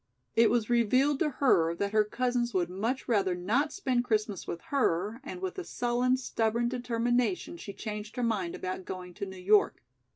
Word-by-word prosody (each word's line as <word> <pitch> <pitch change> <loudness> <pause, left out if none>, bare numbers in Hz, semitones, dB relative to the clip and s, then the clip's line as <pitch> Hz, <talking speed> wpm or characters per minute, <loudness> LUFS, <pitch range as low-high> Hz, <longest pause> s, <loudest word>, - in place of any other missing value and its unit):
It 230 0 +6
was 235 -3 +1
revealed 255 +4 +3
to 310 - +2
her 175 - +3
that 200 +3 -2
her 215 0 +4
cousins 240 +1 -1
would 175 -1 +1
much 225 +8 -2
rather 195 -6 +2
not 230 - 0
spend 260 -10 0
Christmas 215 -5 -1
with 170 - -4
her, 220 -3 +1
and 355 +5 -7
with 375 0 -3
a - - -4
sullen, 245 -2 +1
stubborn 235 -2 0
determination 245 +6 0
she 270 -12 -8
changed 210 0 -6
her 250 - -2
mind 205 -7 -1
about 185 0 -4
going 180 -1 -7
to 200 - -5
New 190 0 -9
York. 200 - +3
230 Hz, 185 wpm, -30 LUFS, 200-250 Hz, -, It